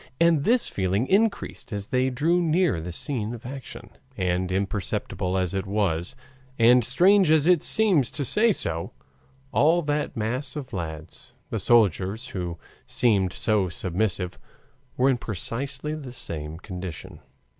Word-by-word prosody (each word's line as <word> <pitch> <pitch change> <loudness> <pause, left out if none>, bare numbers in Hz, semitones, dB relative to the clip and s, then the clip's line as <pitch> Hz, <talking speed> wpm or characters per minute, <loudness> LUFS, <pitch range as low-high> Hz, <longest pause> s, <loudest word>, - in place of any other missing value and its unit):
And 165 -4 +4
this 240 +2 +3
feeling 95 +4 0
increased 200 - 0
as 100 -2 -3
they 130 0 +2
drew 160 +8 +1
near 165 - +2
the 90 +2 -6
scene 115 - -2
of 120 - -13
action. 135 0 -8 0.3
And 90 0 0
imperceptible 95 -1 -2
as 90 -1 0
it 95 0 -2
was, 95 -5 -1 0.4
and 120 +2 +6
strange 180 - +4
as 155 -2 +4
it 175 -3 +5
seems 190 - +3
to 140 +1 -3
say 225 - +3
so, 85 - -3 0.6
all 165 +4 +3
that 145 -2 -2
mass 120 +7 -1
of 145 -4 -7
lads, 80 -3 -7 0.2
the - - -1
soldiers, 110 - +2
who 90 -3 -4 0.3
seemed 100 -7 +2
so 105 -3 +1
submissive, 90 +1 -2 0.6
were 130 - +3
in 130 -2 +3
precisely 130 - -4
the 145 -5 -7
same 80 -9 -7
condition. 90 -3 -7
115 Hz, 145 wpm, -25 LUFS, 95-145 Hz, 0.6 s, and